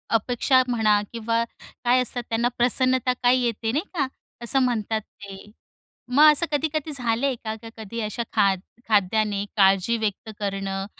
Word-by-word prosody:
अपेक्षा 250 +3 +2
म्हणा 215 -4 +2
किंवा 230 0 -1 0.4
काय 250 +1 +4
असतात 245 0 -3
त्यांना 230 +1 +1
प्रसन्नता 255 +1 +2
काय 245 +1 +5
येते 230 -2 -1
नाही 295 +7 0
का? 285 -6 0 0.4
असं 255 +3 +2
म्हणतात 220 -3 -1
ते. 200 -1 -13 0.6
मग 295 +5 +7
असं 315 +3 +2
कधी-कधी 310 +1 -1
झालंय 250 0 0
का? 220 -1 -3
का 225 - -9
कधी 220 +1 -7
अशा 235 +3 -4
खाद 195 -2 +3 0.3
खाद्याने 205 0 +1
काळजी 195 +3 +4
व्यक्त 220 0 -3
करणं. 195 -1 -3
230 Hz, 145 wpm, -24 LUFS, 210-255 Hz, 0.6 s, मग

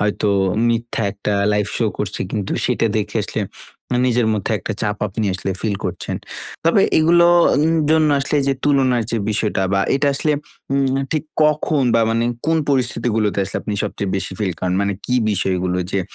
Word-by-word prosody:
হয়তো 105 0 0 0.4
মিথ্যা 115 -1 -1
একটা 105 +1 -3 0.2
লাইভ 105 -1 +1
শো 115 - +1
করছে 105 -1 -3
কিন্তু 105 -3 -3
সেটা - - +1
দেখে - - -2
আসলে - - -3 0.5
আ - - +2
নিজের 120 -2 +2
মধ্যে 105 -1 -2
একটা 110 - -4
চাপ 105 -1 -1
আপনি 105 +3 -3
আসলে 95 +1 -3
ফিল 105 -3 -1
করছেন। - - -3 0.5
তবে 170 +4 +4 0.2
এগুলো 170 +2 +5 0.4
উম 165 +1 +2
জন্য 155 -1 +4
আসলে 140 +2 0
যে, 135 - +3
তুলনার 130 -4 +3
যে, 115 - 0
বিষয়টা 105 -2 0
বা 95 - +2
এটা 140 +1 +1
আসলে 150 +2 +1 0.4
উম 135 0 +2 0.3
ঠিক 155 0 -1 0.2
কখন 150 -1 +1
বা 115 - +4
মানে 115 +1 +1 0.2
কোন 165 0 +3
পরিস্থিতি 125 -3 0
গুলোতে 105 -2 0
আসলে - - -5
আপনি 105 - -4
সবচেয়ে 100 -1 -3
বেশি 95 - -4
ফিল 95 -4 -1
করেন? 90 0 0
মানে 100 0 0
কি 125 - -1 0.2
বিষয়গুলো 90 -2 0
যে, 100 - +1
115 Hz, 180 wpm, -19 LUFS, 100-140 Hz, 0.5 s, এগুলো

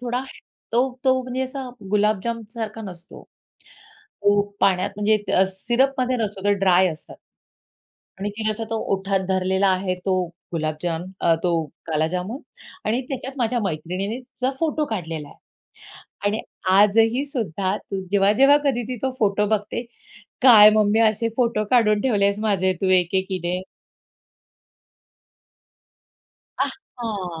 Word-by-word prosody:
थोडा 245 +1 -2 0.5
तो 240 - +4 0.2
तो 260 0 +3
म्हणजे 255 +1 -3
असा 260 0 -5 0.2
गुलाबजाम 215 +2 +1
सारखा 225 -1 -6
नसतो. 180 -3 -10 1.0
तो 205 0 +4 0.2
पाण्यात 185 -1 +2
म्हणजे 210 +1 +3
त 190 - +4
सिरपमध्ये 255 +6 0
नसतो, 210 -4 -3
तो 205 - +4
ड्राय 185 -1 +4
असतं. 160 -2 -8 1.0
आणि 205 +1 -3
तिने 220 -1 0
असा 225 +1 -3
तो 225 - -1 0.2
ओठात 195 0 -1
धरलेला 190 +1 +2
आहे, 185 0 +1
तो 185 0 -1 0.3
गुलाबजाम, 160 +1 -2 0.2
अ, 165 -1 +4
तो 175 -1 +1 0.3
काला 155 -1 +1
जामून 205 - -3 0.5
आणि 230 +4 +1
त्याच्यात 265 -1 -5
माझ्या 240 0 0
मैत्रिणीने 185 +6 -3
तिचा 255 0 -3
फोटो 310 -1 0
काढलेला 165 -6 -4
आहे. - - -17 0.9
आणि 215 +2 0 0.4
आजही 225 +6 +4
सुद्धा 200 - -1
ती 195 -2 -6
जेव्हा-जेव्हा 210 +9 +5
कधी 255 -4 +1
ती 255 - -3
तो 265 - +1
फोटो 210 -1 +2
बघते, 215 +1 -1 0.6
"काय 215 -5 +9
मम्मी, 215 +1 +3
असे 225 +1 +2
फोटो 235 -4 +1
काढून 215 -4 +4
ठेवलेस 200 -4 +1
माझे 190 -4 +1
तू 190 - +1
एक-एकीने." 185 0 -2 3.0
आहा. 205 - -4
210 Hz, 125 wpm, -22 LUFS, 190-235 Hz, 3.0 s, काय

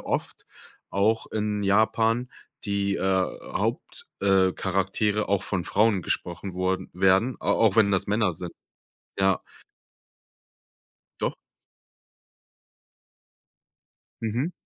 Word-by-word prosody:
oft - - -3 0.5
auch 110 +3 +1
in 105 -1 -1
Japan 110 +4 +2 0.4
die, 100 -1 0
äh, - - -4 0.5
Haupt - - -3
äh, 95 -2 +4
Charaktere 100 +3 0
auch 100 -1 +1
von 95 -3 -1
Frauen 105 -2 +2
gesprochen 90 +3 -4
wurden 95 0 -1
werden, 95 +7 +3
a - - +1
auch 110 -3 +3
wenn 100 -3 +5
das 95 - +1
Männer 105 -2 +2
sind. 85 +1 -6 0.7
Ja, 95 -1 +3 1.8
Doch. - - -1 2.9
Mhm. 120 +9 -1
100 Hz, 100 wpm, -26 LUFS, 95-110 Hz, 2.9 s, wenn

